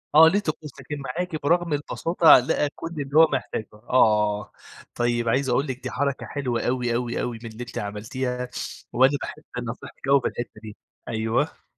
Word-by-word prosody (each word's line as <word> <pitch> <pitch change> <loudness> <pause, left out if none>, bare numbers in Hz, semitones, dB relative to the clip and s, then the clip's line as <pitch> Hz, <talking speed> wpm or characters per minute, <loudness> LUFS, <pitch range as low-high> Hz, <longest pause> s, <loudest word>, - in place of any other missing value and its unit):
آه 160 +1 +10
ليه 195 +5 +3
طقوس. 155 -5 -4
لكن 140 +2 -6
معاكِ 155 +4 -3
برغم 170 +2 +2
البساطة 165 +3 +5
لقى 140 +3 0
كل - - -6
اللي 140 +2 -1
هو 160 0 +9
محتاجه 120 -4 -3
آه. 105 -2 +2 0.4
طيب، 120 -1 +1
عايز 130 +3 +1
أقول 135 +4 +1
لِك 130 -1 -5
دي 125 - -4
حركة 140 +1 -1
حلوة 125 -5 -2
أوي، 120 -1 0
أوي، 120 0 -1
أوي، 120 -2 -3
من 115 - -6
اللي 110 +2 -10
أنتِ 120 - -9
عملتيها، 125 +5 -3 0.4
وأنا 130 +3 +4
باحب 155 - -7 0.3
نصيحتِك 120 +3 -9
أوي 140 0 +5
في - - 0
الحتّة 120 -2 -6
دي 110 -1 -10 0.3
أيوه. 110 +1 -1
125 Hz, 180 wpm, -25 LUFS, 120-145 Hz, 0.4 s, آه